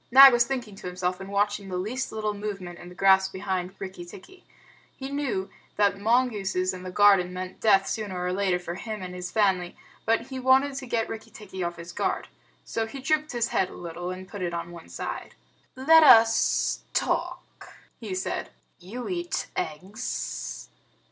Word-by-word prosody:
Nag 270 +1 +10
was 240 0 +4
thinking 240 -6 -4
to - - -7
himself, 180 0 -2
and 190 0 -8
watching 205 0 0
the 180 - -3
least 230 +8 -3
little 215 -1 -2
movement 200 -4 -6
in 175 - -10
the 180 - -13
grass 190 0 +5
behind 190 -1 -3
Rikki 190 -2 -7
tikki. 195 - -13 0.5
He 270 0 -6
knew 270 -10 -2 0.2
that 200 -1 +2
mongooses 205 -5 +1
in 185 - -7
the 185 - -6
garden 195 -2 +5
meant 185 0 -6
death 195 -3 +4
sooner 205 -5 -3
or 180 0 -1
later 190 -2 +1
for 175 -1 -6
him 215 +2 -6
and 180 0 -6
his 180 0 -5
family, 190 -4 +1 0.3
but 225 +1 +2
he 260 +2 -7
wanted 265 +2 +4
to 260 - -6
get 230 -1 0
Rikki 220 0 -7
tikki 195 -4 -9
off 175 0 -2
his 170 +1 -8
guard. - - -1 0.4
So 225 -1 -2
he 275 +4 -8
dropped 305 +2 0
his 240 -1 0
head 185 - +1
a - - -11
little, 175 +1 -6
and 185 +1 -6
put 205 0 -8
it 175 -1 -2
on 170 0 -5
one 170 -1 -11
side. - - -6 0.4
"Let 320 +5 +6
us 225 -6 +5
talk," - - -2 0.3
he 210 -5 -5
said. 185 - -3 0.3
"You 215 +8 -7
eat 345 -2 -3
eggs. 190 +10 -4
200 Hz, 185 wpm, -26 LUFS, 185-235 Hz, 0.5 s, Nag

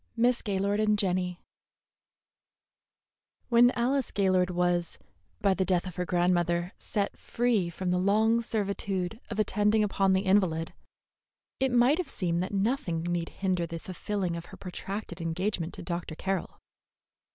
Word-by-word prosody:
MISS 240 +1 +3
GAYLORD 200 0 0
AND 210 -1 +3
JENNY 180 -2 0 2.1
When 240 0 +6
Alice 255 +2 +1
Gaylord 185 -2 +2
was, 175 -1 0 0.4
by 200 -1 +4
the 190 - 0
death 180 -1 +1
of 180 -2 -8
her 180 -1 -2
grandmother, 175 0 +1
set 200 -2 -2
free 230 -7 +1
from 180 +1 -3
the 180 - +2
long 220 +4 +3
servitude 200 -2 -2
of 210 - -4
attending 210 +1 +2
upon 195 -2 +2
the 190 - +3
invalid, 185 -5 +2 0.9
it 265 -1 +2
might 245 +6 +4
have 345 -6 -2
seemed 170 -6 0
that 185 - -3
nothing 195 -5 0
need 175 -1 -1
hinder 185 -3 -1
the 165 - -5
fulfilling 185 +1 -3
of 170 0 -6
her - - -12
protracted 195 +1 -6
engagement 170 +1 -2
to - - -8
Dr. 170 -2 -4
Carroll. 190 +1 -3
190 Hz, 145 wpm, -29 LUFS, 175-210 Hz, 2.1 s, When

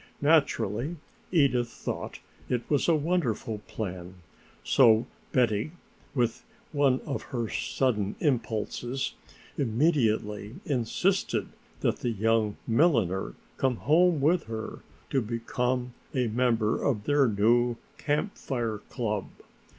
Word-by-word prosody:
Naturally 145 - +2 0.4
Edith 135 -8 +3
thought - - -5 0.3
it 120 -1 0 0.2
a 170 - +5
wonderful 145 -9 -1
plan, 90 -3 -5 0.5
so 115 -3 +5 0.3
Betty, 120 +3 +1 0.4
with 120 -3 0 0.3
one 140 -3 +3
of 140 - -4
her 120 -4 -3
sudden 105 -4 0
impulses, 120 -1 -1 0.5
immediately 115 -5 +1
insisted 150 - 0 0.3
that - - +1
the 120 - -2
young 110 -1 +1
milliner 115 - +2 0.2
come 130 -2 +1
home 165 +6 +3
with 160 +4 +3
her 110 -1 -5 0.3
to 135 - +2
become 125 +2 -2 0.2
a 125 -2 +2
member 115 -2 +1
of 110 -7 0
their 145 +2 +3
new 120 +3 +3 0.2
Camp 150 +8 0
Fire 115 -5 -2
club. 105 -6 -2
120 Hz, 105 wpm, -28 LUFS, 110-140 Hz, 0.5 s, a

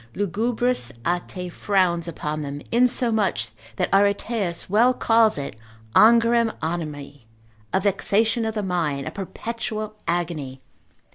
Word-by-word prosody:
Lugubris 230 +6 0
Ate 175 +1 -3
frowns 180 -4 +1
upon 155 -2 -4
them, 145 0 -5
insomuch 235 -3 +2 0.3
that - - -1
Areteus 200 -2 +1
well 235 +6 +4
calls 225 -5 +3
it 140 -5 -5 0.4
angorem 230 0 +5
animi, 145 -6 -5 0.4
a 190 - +2
vexation 210 +4 +1
of 220 0 -2
the 210 - -1
mind, 160 -7 -1
a - - -3
perpetual 215 +2 -5
agony. 165 -6 -2
195 Hz, 115 wpm, -23 LUFS, 170-225 Hz, 0.4 s, angorem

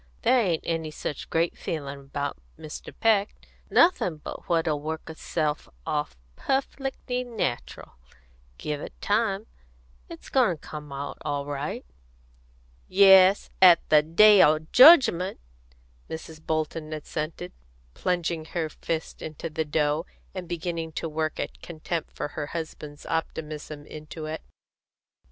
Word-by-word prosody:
"There 255 - +5
ain't 175 -7 0
any 165 -1 -2
such 150 -1 -6
great 165 +1 +1
feelin' 140 -3 -5
about 140 - -4 0.2
Mr. 155 - -8
Peck; 215 -2 +3 0.3
nothin' 185 - +4
but 150 - -9
what'll 165 -3 +1
work 160 +1 -5
itself 155 -1 -2 0.2
off 150 - -2 0.2
perfec'ly 270 -2 -2
natural, 220 - -4 0.6
give 150 -1 -4
it - - -9
time. 210 -1 0 0.6
It's - - -10
goin' 235 - +3
to - - -16
come 150 -1 -8
out 140 +1 -5
all 145 -2 -2
right." 145 +1 -4 1.0
"Yes, 190 0 +6
at 180 -3 +7
the 150 -1 +7
day 195 +6 +7
o' 155 +1 +6 0.2
jedgment," 255 - +7 0.7
Mrs. 160 0 -8
Bolton 155 0 -2
assented, 155 - -5 0.4
plunging 170 - -1
her 160 -1 -3
fists 160 +1 -4
into 160 +1 -6
the 155 +1 -1
dough, 150 +2 0 0.3
and 180 -3 -6
beginning 165 -1 -3
to 165 - -3
work 155 0 -2
a - - 0
contempt 165 0 -4
for - - -5
her 145 0 -5
husband's 155 -2 -7
optimism 155 -2 -4
into 155 +1 -8
it. 155 +1 -5
160 Hz, 130 wpm, -26 LUFS, 150-180 Hz, 1.0 s, at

